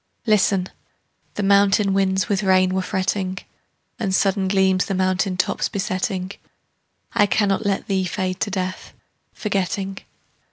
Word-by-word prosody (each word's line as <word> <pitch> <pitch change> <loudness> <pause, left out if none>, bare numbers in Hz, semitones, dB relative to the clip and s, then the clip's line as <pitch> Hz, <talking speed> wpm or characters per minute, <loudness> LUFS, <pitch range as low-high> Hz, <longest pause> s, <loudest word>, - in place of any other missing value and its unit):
Listen: 195 -4 +2 0.7
the 205 - -2
mountain 200 0 +4
winds 195 0 +1
with 200 -3 0
rain 185 -1 +3
were 190 - 0
fretting, 185 0 -2 0.6
And 190 -1 0
sudden 195 0 +1
gleams 190 -1 +2
the 195 - -1
mountain 185 0 0
tops - - 0
besetting. 190 -2 -2 0.8
I 205 - +4
cannot 200 0 +1
let 195 -1 -1
thee 190 -2 0
fade 185 +1 -3
to - - -1
death, 185 -1 -4 0.4
forgetting. 195 -1 -2
190 Hz, 130 wpm, -22 LUFS, 185-200 Hz, 0.8 s, mountain